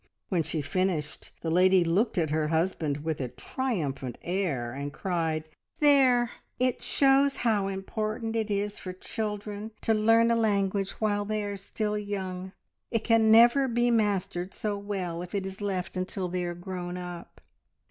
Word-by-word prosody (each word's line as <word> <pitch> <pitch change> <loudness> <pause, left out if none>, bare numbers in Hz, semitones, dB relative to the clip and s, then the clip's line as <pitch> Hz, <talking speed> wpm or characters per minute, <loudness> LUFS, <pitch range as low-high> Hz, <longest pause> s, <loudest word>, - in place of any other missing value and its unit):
When 180 -4 +2
she 155 -1 -3
finished, 175 -2 -2
the 165 - -2
lady 185 +1 +5
looked 190 +8 +1
at 160 -4 +1
her 155 0 +1
husband 160 -3 0
with 160 -3 -2
a 130 - -1
triumphant 140 - -3
air, 165 -11 -1
and 140 +2 -4
cried 160 -1 -1 0.4
"There! 260 -5 +5 0.3
It 255 -1 +1
shows 275 0 +4
how 210 -4 +2
important 215 +4 -3
it 220 -1 0
is 205 0 -1
for 185 - -6
children 210 +1 -4
to 225 - +2
learn 225 +2 +4
a - - +4
language 200 -3 +1
while 205 -2 0
they 215 0 -2
are 205 0 -3
still 210 +2 -3
young. 190 -2 -4 0.4
It 230 -2 -1
can 225 -2 +4
never 240 +4 +7
be 240 0 +2
mastered 195 -4 0
so 210 -1 -2
well 195 -4 -4
if 180 +2 -7
it 195 -1 -1
is 190 +1 -7
left 190 -3 -2
until 185 0 -2
they 180 0 -2
are 175 0 -3
grown 175 0 -5
up." 175 - -8
195 Hz, 165 wpm, -28 LUFS, 175-220 Hz, 0.4 s, never